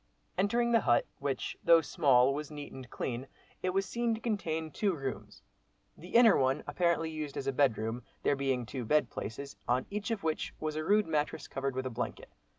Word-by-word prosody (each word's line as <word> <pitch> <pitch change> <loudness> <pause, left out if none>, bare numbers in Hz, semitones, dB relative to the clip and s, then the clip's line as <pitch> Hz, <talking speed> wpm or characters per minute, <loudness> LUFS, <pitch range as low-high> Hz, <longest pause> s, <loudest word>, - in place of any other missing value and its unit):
Entering 235 +5 +2
the 230 - +6
hut, 120 - +3
which 140 -2 -2
though 170 -1 +7
small, 135 -5 +4
was 150 +1 -4
neat 145 -1 -8
and 130 -2 -9
clean; 125 +1 -4 0.3
it 185 - 0
was 195 +1 +1
seen 235 +1 0
to - - -7
contain 165 -9 -2
two 195 +3 0
rooms, 135 -5 -6 0.5
the 175 +6 -10
inner 230 -3 +8
one 130 0 +2
apparently 165 +1 +1
used 155 -2 -5
as 135 - -3
a 135 - 0
bedroom, 115 -3 +1 0.2
there 145 - +3
being 135 -3 0
two 125 +3 -5
bed 130 +2 +2
places, 140 +6 -6
on 125 +1 +2
each 210 +2 -3
of 225 -3 -2
which 160 -1 -2
was 155 -1 -2
a 155 - -2
rude 210 +5 +4
mattress 150 -2 -1
covered 135 -1 -3
with 130 0 -2
a 130 - -2
blanket. 120 +1 -4
150 Hz, 200 wpm, -31 LUFS, 130-185 Hz, 0.5 s, inner